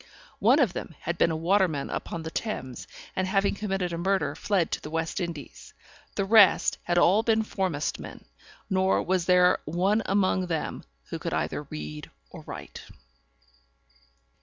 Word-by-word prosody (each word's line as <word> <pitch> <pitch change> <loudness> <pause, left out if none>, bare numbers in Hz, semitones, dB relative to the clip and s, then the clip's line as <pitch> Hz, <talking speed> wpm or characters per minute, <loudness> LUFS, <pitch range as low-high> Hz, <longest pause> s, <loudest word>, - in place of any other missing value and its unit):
One 240 +7 +5
of 250 - +3
them 165 - -6
had 170 +1 -3
been - - +4
a 160 - -1
waterman 165 -3 +1
upon 165 -1 -4
the 160 - -6
Thames, 130 - -4 0.3
and 185 0 0
having 195 +1 +2
committed 195 -4 -2
a 165 - -3
murder, 190 +2 +1
fled 190 -6 0
to - - -2
the - - -7
West 165 +3 -2
Indies. 165 -6 -7 0.4
The 195 - 0
rest 210 -1 +5
had 175 0 -1
all 190 +5 +5
been 225 -1 +2
foremastmen, 185 -8 -3 0.4
nor 190 -1 +2
was 185 -1 0
there 180 0 +5
one 190 +7 +1
among 185 -2 +1
them 165 -3 -3 0.3
who - - -3
could - - -3
either - - -2
read 75 0 -7 0.2
or - - -10
write. - - -8
185 Hz, 160 wpm, -27 LUFS, 165-195 Hz, 0.4 s, One